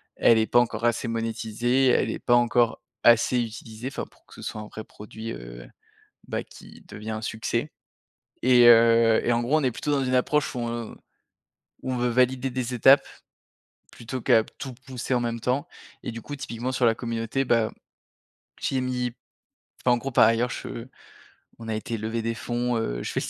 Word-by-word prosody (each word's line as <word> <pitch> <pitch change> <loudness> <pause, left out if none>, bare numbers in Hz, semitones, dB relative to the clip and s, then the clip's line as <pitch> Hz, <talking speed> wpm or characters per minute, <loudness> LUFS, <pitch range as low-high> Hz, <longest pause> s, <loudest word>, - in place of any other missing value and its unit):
Elle 115 -1 +5
est 110 - +1
pas 120 - +4
encore 115 -1 0
assez 120 0 +1
monétisée. 115 +3 0
Elle - - +3
est - - -3
pas 120 - +1
encore 120 -1 +2 0.2
assez 120 +1 +5
utilisée, 115 +2 -7
enfin, - - -5
pour - - -28
que - - -18
ce - - -11
soit 110 - -5
un 105 - -8
vrai 110 - -8
produit, 110 +2 -9
heu, - - -10 0.6
bah, - - -2
qui - - -15
devient 105 +1 -7
un 110 0 -4
succès 115 +6 -2 0.7
et 125 -1 +6
heu 115 -1 +6
et 120 - +2
en 120 0 +1
gros, 140 +6 +2
on 150 - -1
est 125 - +1
plutôt 145 - -4
dans 140 -2 +1
une 130 0 0
approche 145 +3 +1
où 125 - -3
on 115 -1 -4 0.9
où 130 - -3
on - - -1
veut 125 0 +1
valider 130 +2 +1
des 125 0 -3
étapes 135 +4 +6 0.9
plutôt 120 +2 -6
qu'à 110 0 +4
tout 130 +3 -9
pousser 130 0 -3
en 125 - +2
même 115 -1 -2
temps 130 +7 -1 0.3
et - - -5
du 115 0 -7
coup 145 - -6
typiquement 125 -2 -4
sur 125 -1 +1
la 115 - +3
communauté, 115 +3 -2
bah, 115 -2 +2 0.9
j'y 135 - -1
ai 130 - +1
mis 125 -1 -2 0.7
enfin 125 - +3
en 120 - +2
gros 135 +3 -5
par 120 - +6
ailleurs 115 +2 +2
je 115 +1 -6 0.7
on 115 -1 -8
a 110 - -1
été 115 +1 -4
lever 110 +2 -3
des 115 +1 -2
fonds, 120 +1 -2
heu, - - -2
je - - -4
fais - - -1
le - - -4
120 Hz, 205 wpm, -25 LUFS, 115-125 Hz, 0.9 s, et